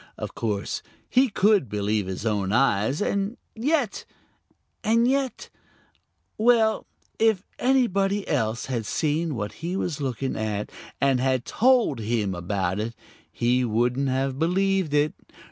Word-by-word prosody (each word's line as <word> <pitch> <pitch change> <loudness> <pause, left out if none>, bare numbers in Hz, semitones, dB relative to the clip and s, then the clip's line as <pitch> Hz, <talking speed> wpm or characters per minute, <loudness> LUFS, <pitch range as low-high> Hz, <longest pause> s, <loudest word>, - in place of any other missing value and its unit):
Of - - -5
course 105 -3 -2 0.3
he 260 +1 +4
could 205 - +3
believe 105 -1 -1
his 95 +3 -5
own 100 -3 0
eyes, 125 - +2
and 200 +4 -1 0.2
yet 255 -1 0 0.8
and 230 +2 +3
yet 270 -1 -1 0.9
well, 225 -1 +3 0.3
if 220 -4 +3 0.2
anybody 205 -6 +2
else 115 -5 0
had 120 -5 -3
seen 155 0 0
what 105 -3 -3
he 175 +3 -2
was 160 -6 -2
looking 135 0 -2
at 105 -1 -3 0.3
and 135 -2 +3
had 130 -1 +1
told 245 - +3
him 110 -3 -1
about 95 +1 -2
it, 115 +2 -3 0.4
he 125 +2 +1
wouldn't 125 +4 +1
have 135 +1 -1
believed 185 -1 +1
it. 150 +1 +2
135 Hz, 130 wpm, -25 LUFS, -, 0.9 s, he